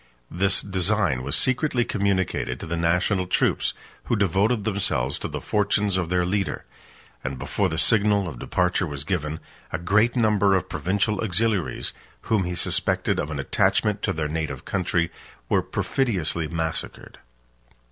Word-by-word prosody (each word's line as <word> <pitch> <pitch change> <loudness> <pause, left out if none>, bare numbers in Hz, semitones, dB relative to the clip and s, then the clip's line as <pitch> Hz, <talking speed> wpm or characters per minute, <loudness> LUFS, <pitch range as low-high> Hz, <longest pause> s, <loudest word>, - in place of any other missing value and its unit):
This 95 +2 +2
design 95 -7 +1
was 70 +2 -1
secretly 130 -1 +1
communicated 95 - -1
to - - -6
the 85 +1 -3
national 90 +3 +1
troops, - - +1 0.3
who - - +1
devoted 100 +3 +2
themselves 95 - 0
to - - -3
the - - -5
fortunes 105 -1 +1
of 90 -3 -1
their 90 -1 +1
leader; 95 +1 -1 0.6
and 65 0 -3
before 65 - -1
the - - -3
signal 105 -3 +3
of 70 -8 -7
departure 90 +4 0
was 70 -2 -5
given, 75 -2 -2 0.3
a - - -1
great 105 +7 +2
number 105 -4 +3
of 95 - 0
provincial 100 +3 0
auxiliaries, 105 -2 0 0.3
whom 105 -4 +1
he 90 0 -3
suspected - - +1
of 75 - -2
an 75 - -4
attachment 105 +8 +1
to 100 - 0
their 80 -4 -2
native 75 -4 -4
country, 85 -3 0 0.4
were - - +3
perfidiously 90 - -1
massacred. 80 0 -4
95 Hz, 150 wpm, -24 LUFS, 80-105 Hz, 0.6 s, signal